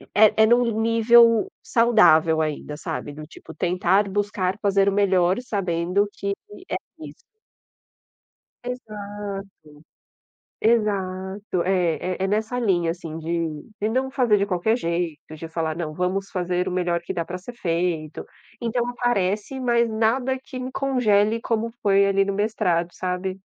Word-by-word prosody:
é 215 +1 +6
é - - +7
num 240 +2 +4 0.2
nível 230 0 +5
saudável 190 -9 +4
ainda, 150 -1 -3
sabe. 160 -2 -5
Do 155 +1 -9
tipo 160 - -13
tentar 185 +3 +1
buscar 200 -1 -1
fazer 200 -1 +2
o - - 0
melhor 190 -2 +2
sabendo 195 -3 0
que 200 0 -3 0.4
é - - -1 0.3
isso. - - -8 1.5
Exato. 205 -5 -6 1.1
Exato. 195 -4 0
É 180 -3 +1 0.2
é 190 - -3
é - - +1
nessa 220 +4 -1
linha, 175 -7 +1
assim, 165 -2 -7
de 165 -2 -3 0.2
de 215 - 0
não 260 +3 0
fazer 245 -6 +2
de 200 - +1
qualquer 200 +3 +1
jeito, 170 -5 -2 0.2
de 165 +1 -8
falar: 160 -1 -2
"Não, 160 -2 -4
vamos 185 +4 -2
fazer 180 0 -1
o - - -2
melhor 175 -1 0
que 175 - -5
dá 170 -2 -2
pra 180 +2 -6
ser 190 +7 -10
feito". 170 -6 -2 0.3
Então 235 +1 -1
aparece, 240 0 -1
mas 235 -2 +2
nada 245 +4 0
que 260 - -8
me 255 +1 -5
congele 230 -6 +2
como 230 0 -1
foi 200 -1 +4
ali 195 0 +2
no 200 - -2
mestrado, 180 -5 0
sabe? 185 +1 -3
195 Hz, 150 wpm, -23 LUFS, 175-220 Hz, 1.5 s, é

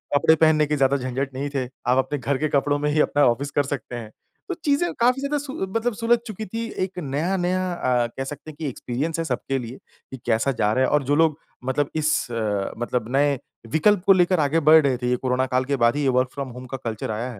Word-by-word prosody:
कपड़े 160 +3 +5
पहनने 155 -1 +4
के 150 - 0
ज़्यादा 135 0 +3
झंझट 135 +1 -3
नहीं 140 +2 -3
थे, 135 -2 -2 0.2
आप 125 +1 +3
अपने 145 +2 0
घर 130 +2 -1
के 155 - 0
कपड़ों 145 +1 +1
में 150 0 0
ही 155 - +1
अपना 145 0 +2
ऑफिस 135 +4 0
कर 145 - +2
सकते 130 -3 -5
हैं, 115 -3 -7 0.4
तो - - 0
चीज़ें 295 +4 +2
काफ़ी 250 +3 +3
ज़्यादा 280 +1 -1
सु 280 -1 -6 0.2
मतलब 235 +1 0
सुलझ 235 +2 +3
चुकी 215 0 -6
थीं। 225 +3 -4
एक 185 -1 -5
नया-नया 180 +5 -1
अ, 125 -7 +1
कह 135 - -2
सकते 145 +3 -8
हैं 150 - -17
कि 155 - -3
एक्सपीरियंस 145 +7 -3
है 165 - -1
सबके 135 -3 -2
लिए, 125 +1 -7 0.3
कि 130 - -6
कैसा 115 +3 +2
जा 105 -5 +1
रहा 130 +3 +2
है - - +2
और 150 -1 +2
जो 145 +2 +1
लोग 160 -1 +3 0.3
मतलब 135 +2 0
इस 155 -5 0
अ, 105 -4 -1
मतलब 120 -1 -2
नए 140 -1 +2 0.3
विकल्प 180 +5 +3
को 195 - +7
लेकर 180 -1 +3
आगे 150 +2 +2
बढ़ 160 0 +9
रहे 130 -3 +2
थे 125 0 -2
ये 125 - +3
कोरोना 130 +1 0
काल 130 0 0
के 140 +1 0
बाद 120 - +3
ही 145 - -1
ये - - +2
वर्क 130 - 0
फ्रॉम 140 -2 -5
होम 125 +1 -9
का 135 +2 -5
कल्चर 110 -1 -3
आया 115 +4 -3
है। 110 - -11
140 Hz, 250 wpm, -23 LUFS, 130-165 Hz, 0.4 s, बढ़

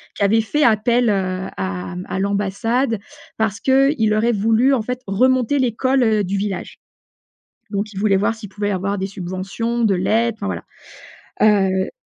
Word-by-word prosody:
qui 200 - -1
avait 220 +3 +4
fait 295 +7 0
appel, 235 0 +3
heu, 190 -1 -1
à 95 - -4
mmh, 180 - -6
à 190 - -3
l'ambassade 205 +4 0 0.4
parce 220 -1 -1
qu'il 265 -4 +3
aurait 225 +3 +2
voulu, 225 +5 +3
en 240 - +1
fait, 250 +3 -4
remonter 255 +6 +2
l'école, 255 +2 +1
heu, 215 -2 +2
du 195 +2 -2
village. 195 -2 -4 0.9
Donc 205 +1 -2
il 190 - -5
voulait 200 -2 +3
voir 205 +3 0
s'il 215 -3 -10
pouvait 205 +1 -3
avoir 200 +1 -2
des 195 - -2
subventions, 195 +5 -3
de 200 -3 +3
l'aide, 225 +5 +1
enfin, 200 - -4
voilà. - - -3 0.8
Heu 195 -3 +3
210 Hz, 170 wpm, -20 LUFS, 195-235 Hz, 0.9 s, avait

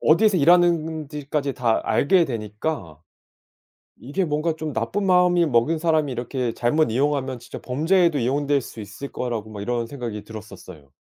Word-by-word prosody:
어디에서 190 +5 +4
일하는지까지 155 -4 +1
다 115 -3 +1
알게 170 +4 +3
되니까 105 - -5 1.0
이게 150 +9 -2
뭔가 155 +1 0
좀 155 -3 -5
나쁜 115 - -2
마음이 180 -2 +4
먹은 145 +4 +2
사람이 155 -4 +1
이렇게 125 0 -3
잘못 150 +4 +1
이용하면 135 0 0
진짜 120 - -9
범죄에도 165 +4 +2
이용될 140 +3 +1
수 115 - -10
있을 105 +8 -8
거라고 115 -4 -4
막 100 -1 -7
이런 120 +2 -1
생각이 115 -6 -6
들었었어요. 95 -9 -11
140 Hz, 360 characters per minute, -23 LUFS, 115-160 Hz, 1.0 s, 어디에서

